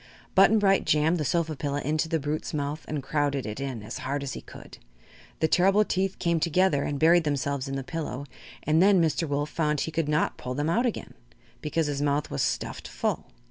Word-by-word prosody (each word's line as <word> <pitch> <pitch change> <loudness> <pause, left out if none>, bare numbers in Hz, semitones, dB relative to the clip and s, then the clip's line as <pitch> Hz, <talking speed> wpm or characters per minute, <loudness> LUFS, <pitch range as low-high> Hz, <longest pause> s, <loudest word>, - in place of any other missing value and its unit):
Button 195 +3 +6
Bright 195 -2 +3
jammed 160 +3 +2
the - - 0
sofa 160 +3 0
pillow 145 0 -2
into 155 +3 -1
the 165 -1 +1
brute's 150 +2 -3
mouth 145 +1 -3
and 150 -3 -3
crowded 140 -1 -1
it 105 +3 -5
in 130 -6 -4
as 110 +3 -6
hard 140 +2 -3
as 140 - -4
he - - -7
could. - - -13 0.6
The 160 - +4
terrible 195 +5 +4
teeth 190 0 -1
came 170 -2 +1
together 170 -2 +2
and 145 - -2
buried 165 +3 +5
themselves 140 -2 -1
in 135 - -4
the 135 - -3
pillow, 145 -3 -5 0.4
and 155 +2 +3
then 195 0 +5
Mr. 165 0 +1
Wolf 145 +1 -1
found 150 -3 0
he 160 - -2
could 160 -1 -1
not 150 0 +1
pull 125 0 -5
them 145 +3 0
out 240 +7 +2
again 230 - -5 0.5
because 155 +2 0
his 145 -1 -2
mouth 145 0 0
was 70 - -2
stuffed - - -2
full. - - -2
150 Hz, 215 wpm, -27 LUFS, 140-165 Hz, 0.6 s, Button